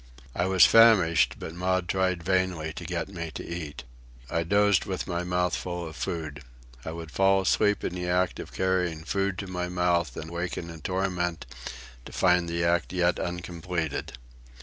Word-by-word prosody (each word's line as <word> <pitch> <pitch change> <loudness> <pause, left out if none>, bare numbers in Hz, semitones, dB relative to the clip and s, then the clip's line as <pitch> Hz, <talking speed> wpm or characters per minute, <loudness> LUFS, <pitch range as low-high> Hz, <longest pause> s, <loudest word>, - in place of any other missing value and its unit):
I 85 - +1
was 95 -1 +7
famished, 105 -9 +6
but 80 - -7
Maud 90 +1 0
tried 95 -2 0
vainly 90 -3 0
to 85 - -7
get 85 -1 -2
me 85 -4 -5
to - - -6
eat. 80 -7 -6 0.5
I 85 - +1
dozed 100 +3 +3
with 95 -3 -3
my 85 -1 -2
mouth 90 0 0
full 90 -2 -4
of 80 - -9
food. 75 -5 -4 0.4
I 80 - -5
would 80 -1 -7
fall 95 +2 +3
asleep 105 +2 +2
in - - -2
the 90 -1 -4
act 90 +1 +1
of - - -7
carrying 90 -4 0
food 95 +2 -1
to 100 - -4
my 90 -1 -3
mouth 85 -5 +1
and 80 - -6
waken 85 0 -4
in 80 -1 -10
torment 90 -3 -1 0.6
to - - -9
find 90 -1 +3
the 85 0 -1
act 85 0 +1
yet 90 -1 +2
uncompleted. 85 -2 -3
90 Hz, 175 wpm, -27 LUFS, 85-95 Hz, 0.6 s, was